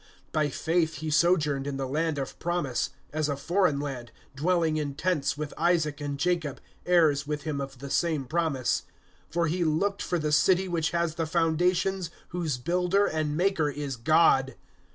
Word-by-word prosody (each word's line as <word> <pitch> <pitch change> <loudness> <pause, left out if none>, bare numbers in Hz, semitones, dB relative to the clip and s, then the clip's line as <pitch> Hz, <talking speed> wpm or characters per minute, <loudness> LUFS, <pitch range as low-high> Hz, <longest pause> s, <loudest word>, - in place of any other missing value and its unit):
(9)By 150 -2 +1
faith 160 +2 0
he 155 +2 -4
sojourned 150 -4 +2
in 140 -1 -3
the 135 - -2
land 155 +3 -1
of 135 -1 -5
promise, 170 -7 -1 0.2
as 155 -1 0
a 140 - 0
foreign 170 0 +1
land, 130 -5 -5 0.2
dwelling 165 +1 +1
in 145 -2 -3
tents 150 -3 0
with 150 -1 -4
Isaac 155 -4 +1
and 145 -1 -3
Jacob, 165 -3 -1 0.3
heirs 155 -5 +3
with 150 -1 -3
him 150 -3 -2
of 135 -1 -6
the 140 +2 -8
same 160 -6 +1
promise; 155 -4 0 0.5
(10)for 170 0 +1
he 175 +3 0
looked 195 +6 0
for 175 - -1
the 155 -2 -1
city 185 +5 +4
which 165 -2 0
has 170 -1 0
the 165 0 -2
foundations, 175 +2 +1 0.2
whose 165 -7 -2
builder 180 +8 +1
and 155 -4 -1
maker 175 -4 +2
is 145 -2 -4
God. 135 +1 +3
155 Hz, 175 wpm, -27 LUFS, 145-175 Hz, 0.5 s, city